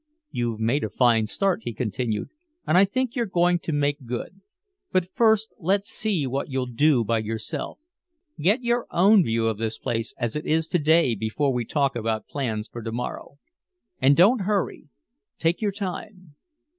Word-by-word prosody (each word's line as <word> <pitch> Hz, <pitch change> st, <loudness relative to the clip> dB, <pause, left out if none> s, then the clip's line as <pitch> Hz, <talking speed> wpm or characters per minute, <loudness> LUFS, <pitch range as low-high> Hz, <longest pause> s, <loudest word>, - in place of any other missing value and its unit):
"You've 120 Hz, -2 st, -2 dB
made 120 Hz, +6 st, +1 dB
a 110 Hz, -, -2 dB
fine 115 Hz, -3 st, +3 dB
start," 195 Hz, -, 0 dB
he 120 Hz, -, -4 dB
continued, 110 Hz, -1 st, -2 dB, 0.4 s
"and 155 Hz, -, +1 dB
I 190 Hz, +2 st, +7 dB
think 255 Hz, +4 st, -2 dB
you're 235 Hz, -3 st, 0 dB
going 175 Hz, -1 st, +2 dB
to 165 Hz, -, -4 dB
make 145 Hz, -3 st, -1 dB
good. 125 Hz, +10 st, -5 dB, 0.5 s
But 185 Hz, -1 st, +1 dB
first 220 Hz, -1 st, +3 dB
let's 195 Hz, +4 st, 0 dB
see 200 Hz, -12 st, -1 dB
what 135 Hz, +3 st, -3 dB
you'll 130 Hz, -1 st, -1 dB
do 125 Hz, +1 st, +2 dB
by 115 Hz, +1 st, +1 dB
yourself. 110 Hz, 0 st, -4 dB, 0.6 s
Get 205 Hz, -, +2 dB
your 240 Hz, 0 st, 0 dB
own 195 Hz, +2 st, +5 dB
view 115 Hz, -3 st, 0 dB
of 110 Hz, -2 st, -2 dB
this 110 Hz, 0 st, -2 dB
place 115 Hz, 0 st, -3 dB
as 120 Hz, -3 st, -2 dB
it 150 Hz, -, -4 dB
is 160 Hz, +1 st, +2 dB
to 175 Hz, -, +1 dB
day 160 Hz, -3 st, +4 dB
before 110 Hz, +6 st, -1 dB
we 120 Hz, -1 st, -1 dB
talk 140 Hz, +1 st, 0 dB
about 110 Hz, -1 st, -2 dB
plans 115 Hz, -6 st, -3 dB
for 120 Hz, -, -8 dB
to 115 Hz, 0 st, -5 dB
morrow. 125 Hz, +4 st, -5 dB, 0.6 s
And 135 Hz, +2 st, +5 dB
don't 205 Hz, +7 st, +5 dB
hurry. 200 Hz, -5 st, -1 dB, 0.5 s
Take 165 Hz, +4 st, 0 dB
your 210 Hz, -2 st, +1 dB
time." 185 Hz, -3 st, -7 dB
145 Hz, 180 wpm, -24 LUFS, 115-185 Hz, 0.6 s, I